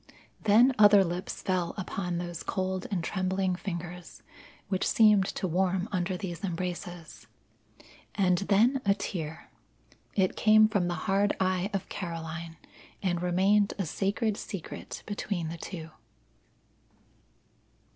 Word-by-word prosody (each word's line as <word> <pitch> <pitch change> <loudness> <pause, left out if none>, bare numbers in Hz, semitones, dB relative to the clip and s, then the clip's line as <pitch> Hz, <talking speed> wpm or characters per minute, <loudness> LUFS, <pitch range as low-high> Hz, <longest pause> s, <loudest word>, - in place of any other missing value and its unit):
Then 230 +6 +6
other 205 -1 +8
lips 175 +1 -4
fell 180 -2 -1
upon 180 -2 -3
those 175 -1 -5
cold 185 -1 -2
and 185 -5 -1
trembling 190 0 0
fingers, 175 -1 -7 0.4
which 190 -1 0
seemed 210 -3 +5
to 185 - -1
warm 185 +2 0
under 185 -1 -1
these 175 -1 -6
embraces. 175 -2 -5 0.9
And 180 -3 +3
then 220 +7 +3
a 200 -1 +3
tear. 165 -5 -5 0.6
It 190 -2 +2
came 215 0 +6
from 200 -5 0
the 175 - -1
hard 200 +1 +2
eye 185 0 +1
of 195 -2 -3
Caroline, 165 -2 -6 0.5
and 175 -2 0
remained 195 +4 +2
a 195 - -1
sacred 200 +5 -1
secret 190 -6 -7
between 200 -5 -3
the 170 - -6
two. 165 -2 -7
185 Hz, 125 wpm, -29 LUFS, 175-200 Hz, 0.9 s, other